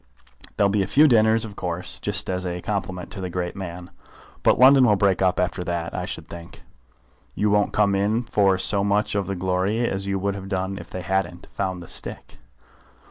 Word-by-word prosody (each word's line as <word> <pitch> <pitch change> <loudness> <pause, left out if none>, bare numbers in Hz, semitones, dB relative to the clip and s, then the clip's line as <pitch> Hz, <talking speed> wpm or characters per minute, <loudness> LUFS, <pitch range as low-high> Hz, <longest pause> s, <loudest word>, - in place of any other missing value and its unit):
There'll 100 -1 +3
be 105 0 +2
a 95 - -1
few 150 +9 +5
dinners 110 -3 +4
of 105 -2 -9
course, 90 -1 -3
just - - -1
as 90 0 -2
a 90 -1 -3
compliment 95 -1 -4
to 95 - -6
the 90 - -4
great 90 0 -3
man, 90 -2 -7 0.5
but - - +4
London 130 0 +7
will 105 - +4
break 95 -1 +2
up 90 -1 +2
after 90 0 -1
that, 85 -1 -3
I - - -3
should - - -7
think. 85 0 -11 0.7
You 105 0 +1
won't 105 0 +2
come 105 -2 +2
in 105 +4 +1
for 100 -4 +2
so 100 +1 0
much 105 +1 +1
of 100 -2 -1
the 100 - -2
glory 95 +6 0
as 95 0 -3
you 100 0 0
would 100 +1 -1
have 95 -1 -8
done 95 0 -2
if - - -11
they 95 - -6
hadn't 95 -2 -2
found 95 -2 -3
the - - -12
stick. - - -6
95 Hz, 210 wpm, -23 LUFS, 90-105 Hz, 0.7 s, London